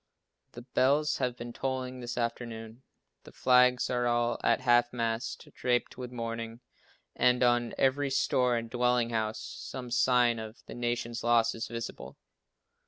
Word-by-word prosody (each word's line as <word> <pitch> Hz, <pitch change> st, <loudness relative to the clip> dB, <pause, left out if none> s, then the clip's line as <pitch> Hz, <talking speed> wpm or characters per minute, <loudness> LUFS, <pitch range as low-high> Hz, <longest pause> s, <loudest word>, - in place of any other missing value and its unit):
The 120 Hz, -, -9 dB
bells 140 Hz, +4 st, +2 dB
have 125 Hz, -2 st, -1 dB
been 120 Hz, 0 st, -7 dB
tolling 130 Hz, -1 st, -3 dB
this 120 Hz, 0 st, -6 dB
afternoon. 115 Hz, -1 st, -4 dB, 0.4 s
The -, -, -13 dB
flags 125 Hz, 0 st, +4 dB
are 120 Hz, -1 st, +1 dB
all 120 Hz, 0 st, +1 dB
at -, -, +3 dB
half 120 Hz, -1 st, +4 dB
mast, 115 Hz, -1 st, -3 dB
draped 120 Hz, -1 st, 0 dB
with 125 Hz, -1 st, -7 dB
mourning, 115 Hz, -1 st, -5 dB, 0.5 s
and 125 Hz, 0 st, +3 dB
on 120 Hz, -1 st, +2 dB
every 135 Hz, +1 st, +2 dB
store 125 Hz, -2 st, +2 dB
and 115 Hz, 0 st, -4 dB
dwelling 125 Hz, 0 st, +1 dB
house 110 Hz, -1 st, -1 dB
some 125 Hz, -2 st, -7 dB
sign 120 Hz, -1 st, +3 dB
of 110 Hz, +1 st, -9 dB
the -, -, -9 dB
nation's 120 Hz, -1 st, -3 dB
loss 115 Hz, -1 st, +3 dB
is 115 Hz, -, -5 dB
visible. 115 Hz, -1 st, -7 dB
120 Hz, 150 wpm, -30 LUFS, 115-125 Hz, 0.5 s, flags